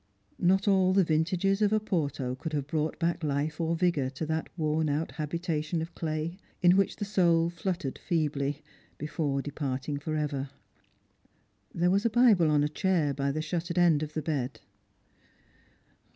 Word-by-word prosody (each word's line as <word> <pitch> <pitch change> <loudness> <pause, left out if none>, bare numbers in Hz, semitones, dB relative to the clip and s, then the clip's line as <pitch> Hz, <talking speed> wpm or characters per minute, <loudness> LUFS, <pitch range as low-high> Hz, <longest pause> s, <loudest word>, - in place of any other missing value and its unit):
Not 190 +3 +3
all 190 -2 +4
the 195 0 +5
vintages 175 +5 +1
of 210 -1 +3
Oporto 155 -12 -1
could 155 +4 -6
have 145 -2 -1
brought 155 +1 -2
back 170 0 -1
life 150 +2 -1
or 165 0 +1
vigour 165 -6 +1
to 140 +4 -5
that 160 +1 -2
worn 155 -1 +1
out 150 +3 -1
habitation 160 +1 -2
of 165 +1 -5
clay, 160 +3 -3 0.2
in 175 +1 +7
which 195 -1 +2
the 205 - -4
soul 170 -4 +3
fluttered 170 -4 -3
feebly, 150 -4 -1 0.3
before 145 -2 -2
departing 140 -1 -3
for 155 +2 -3
ever. 145 -3 -2 1.2
There 175 +1 +1
was 200 +2 +2
a 230 - +3
Bible 215 -8 +5
on 150 -1 +3
a - - +2
chair 160 -2 +1
by 140 0 -1
the 155 +2 -2
shuttered 170 +2 -3
end 170 -4 +4
of 155 0 -4
the 155 - -2
bed. 140 -5 -2
160 Hz, 165 wpm, -29 LUFS, 150-175 Hz, 1.2 s, in